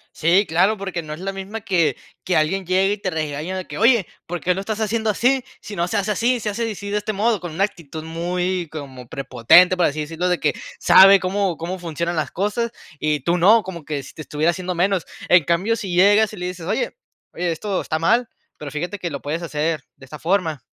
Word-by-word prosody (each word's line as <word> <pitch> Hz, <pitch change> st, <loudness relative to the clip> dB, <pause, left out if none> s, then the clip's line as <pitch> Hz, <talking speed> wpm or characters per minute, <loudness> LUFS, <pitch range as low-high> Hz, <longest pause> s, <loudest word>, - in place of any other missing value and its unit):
Sí, 175 Hz, +6 st, +3 dB
claro, 190 Hz, +7 st, +2 dB
porque 190 Hz, -4 st, -4 dB
no 150 Hz, -1 st, -6 dB
es 155 Hz, -, -8 dB
la 195 Hz, +2 st, -3 dB
misma 195 Hz, +3 st, -6 dB
que 175 Hz, -5 st, +1 dB, 0.3 s
que 180 Hz, -, 0 dB
alguien 185 Hz, +5 st, +1 dB
llegue 190 Hz, +3 st, +2 dB
y 210 Hz, -, -4 dB
te 195 Hz, -, -3 dB
regaña 155 Hz, +3 st, -3 dB
de 185 Hz, -, -5 dB
que: -, -, -7 dB
"Oye, 230 Hz, -4 st, +4 dB, 0.2 s
¿por 175 Hz, +1 st, -4 dB
qué 180 Hz, -, +2 dB
lo 185 Hz, -, -4 dB
estás 215 Hz, +2 st, -4 dB
haciendo 220 Hz, 0 st, 0 dB
así? 250 Hz, +5 st, +2 dB, 0.2 s
Si 210 Hz, -, -8 dB
no 170 Hz, -1 st, 0 dB
se 210 Hz, -, -1 dB
hace 205 Hz, +1 st, 0 dB
así, 240 Hz, +4 st, +1 dB
se 210 Hz, -1 st, -3 dB
hace 230 Hz, +3 st, -2 dB
di 220 Hz, -2 st, -3 dB
si, 200 Hz, +1 st, -7 dB
de 205 Hz, -, 0 dB
este 210 Hz, +1 st, -2 dB
modo", 215 Hz, +1 st, +1 dB
con 175 Hz, -2 st, -6 dB
una 175 Hz, +5 st, 0 dB
actitud 160 Hz, -6 st, -5 dB
muy 175 Hz, +2 st, -2 dB
como 135 Hz, -5 st, -8 dB
prepotente, 135 Hz, +9 st, +4 dB
por 175 Hz, -, +3 dB
así 150 Hz, +1 st, -1 dB
decirlo, 165 Hz, +4 st, -2 dB
de 180 Hz, -1 st, +1 dB
que -, -, +1 dB, 0.3 s
sabe 195 Hz, +1 st, +8 dB
cómo 185 Hz, -2 st, -1 dB
cómo 175 Hz, +4 st, -5 dB
funcionan 170 Hz, 0 st, -3 dB
las 155 Hz, -, -2 dB
cosas, 210 Hz, +5 st, -1 dB, 0.3 s
y 150 Hz, -1 st, 0 dB
tú 170 Hz, +6 st, +1 dB
no, 210 Hz, +6 st, +6 dB
como 170 Hz, -5 st, -8 dB
que 145 Hz, -2 st, -3 dB
si 135 Hz, -, -12 dB
te -, -, -9 dB
estuviera 155 Hz, +4 st, +1 dB
haciendo 180 Hz, +1 st, -4 dB
menos. 185 Hz, +1 st, +1 dB, 0.2 s
En 175 Hz, -2 st, +6 dB
cambio, 180 Hz, +9 st, +1 dB
si 195 Hz, -5 st, -5 dB
llegas 205 Hz, +4 st, +5 dB
y 210 Hz, -, -9 dB
le 180 Hz, 0 st, -3 dB
dices: 180 Hz, -2 st, -7 dB
"Oye, 215 Hz, -, -1 dB, 0.4 s
oye, 175 Hz, -1 st, -1 dB
esto 190 Hz, +4 st, -2 dB
está 155 Hz, 0 st, -2 dB
mal, 235 Hz, +8 st, +2 dB, 0.3 s
pero 145 Hz, -2 st, -7 dB
fíjate 175 Hz, +7 st, -4 dB
que 175 Hz, -, -3 dB
lo 140 Hz, -, -5 dB
puedes 155 Hz, +4 st, -3 dB
hacer 155 Hz, -2 st, -2 dB
de 135 Hz, -, -15 dB
esta 150 Hz, +3 st, -10 dB
forma". 165 Hz, -6 st, 0 dB
180 Hz, 240 wpm, -21 LUFS, 160-200 Hz, 0.4 s, sabe